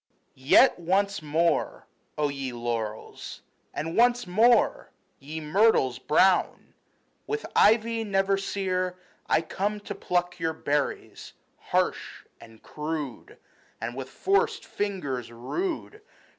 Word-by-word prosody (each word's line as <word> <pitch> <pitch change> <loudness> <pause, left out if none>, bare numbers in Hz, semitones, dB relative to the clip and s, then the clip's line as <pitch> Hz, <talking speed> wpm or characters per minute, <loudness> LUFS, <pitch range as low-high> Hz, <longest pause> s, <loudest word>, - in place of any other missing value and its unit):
YET 130 +6 +5
once 195 +3 0
more, 160 +3 0 0.3
O 150 -1 +1
ye 135 -2 -4
laurels, 115 -2 -5 0.3
and 160 +3 -4
once 245 0 +3
more. 225 +7 +3 0.3
Ye 150 +3 -7
myrtles 155 - +2
brown, 185 +5 +2 0.5
with 435 +1 -3
ivy 225 +1 +4
never 195 -1 +1
sere, 185 -2 -2 0.3
I - - +4
come 205 +5 -2
to - - -6
pluck 175 0 -2
your 165 -1 -1
berries 145 -2 -3 0.3
harsh - - -2
and 115 -1 -16
crude, 150 -4 -6 0.4
And 115 +2 -5
with 130 0 -6
forced 395 - 0
fingers 145 - -3
rude 345 - -4
175 Hz, 110 wpm, -27 LUFS, 140-205 Hz, 0.5 s, YET